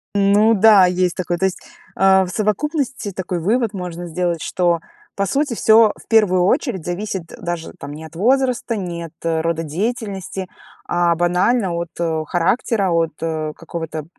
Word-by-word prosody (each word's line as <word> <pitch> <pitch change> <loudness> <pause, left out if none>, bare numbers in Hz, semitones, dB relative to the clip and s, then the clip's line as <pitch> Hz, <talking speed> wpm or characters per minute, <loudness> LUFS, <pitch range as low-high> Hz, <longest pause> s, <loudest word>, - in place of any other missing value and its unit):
Ну 205 +3 +4
да, 210 -2 +7
есть 180 -1 +1
такое. 175 -1 -2
То 190 - +2
есть, 190 - -1 0.4
а, 190 0 +5
в - - -7
совокупности 240 - -1
такой 180 -1 -4
вывод 220 +5 0
можно 175 -2 -6
сделать, 170 -1 -2
что, 175 -2 +1 0.4
по 200 - 0
сути, 275 +5 0
всё 220 0 +5
в - - -18
первую 205 -5 +4
очередь 200 - 0
зависит 185 0 -3 0.2
даже 170 -1 -4
там 145 +1 -7
не 155 +2 -9
от 160 +1 -13
возраста, 250 +3 +1
не 175 -4 -4
от 165 - -12
рода 165 0 0
деятельности, 195 +2 -4 0.4
а 175 -1 +2
банально 180 +4 +1
от, 170 0 -3
э, 160 -2 -1
характера, 195 +2 +1
от, 165 -2 +1
э, 155 -2 -2
какого-то, 160 -2 -6
185 Hz, 160 wpm, -19 LUFS, 170-215 Hz, 0.4 s, да